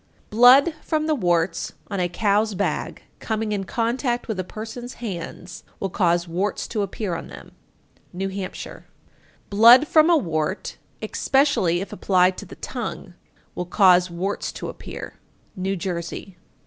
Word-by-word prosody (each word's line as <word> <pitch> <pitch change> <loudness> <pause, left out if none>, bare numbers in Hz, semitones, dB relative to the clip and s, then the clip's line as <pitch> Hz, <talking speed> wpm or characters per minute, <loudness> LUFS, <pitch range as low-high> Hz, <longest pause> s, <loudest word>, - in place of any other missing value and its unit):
872. 215 - -5 0.3
Blood 310 - -24
from 310 -1 -1
the 310 - +1
warts 175 - 0 0.2
on 200 - -2
a 175 -1 0
cow's 210 +3 +1
bag 200 +2 -2 0.2
coming 220 -1 -2
in 200 -2 -2
contact 240 +3 -1
with 220 -5 -3
a - - 0
person's 225 +6 -8
hands 180 -4 -7 0.2
will 195 - -3
cause 175 -2 +1
warts 185 +5 -2
to 215 - -2
appear 200 -1 -3
on - - -5
them. - - -12 0.6
New 190 +2 -3
Hampshire. 190 -1 -7 0.7
873. - - -3
Blood 245 +6 +9
from 310 +1 +5
a 340 - +6
wart, 165 - -2 0.3
especially 230 - +1
if 195 - -7
applied 185 0 +3
to - - -9
the - - -11
tongue, - - -6 0.4
will 180 - -4
cause 180 -2 +5
warts 185 +4 -3
to - - -6
appear. - - -9 0.4
_New 190 0 -2
Jersey. 175 +1 -5
195 Hz, 155 wpm, -23 LUFS, 180-225 Hz, 0.7 s, Blood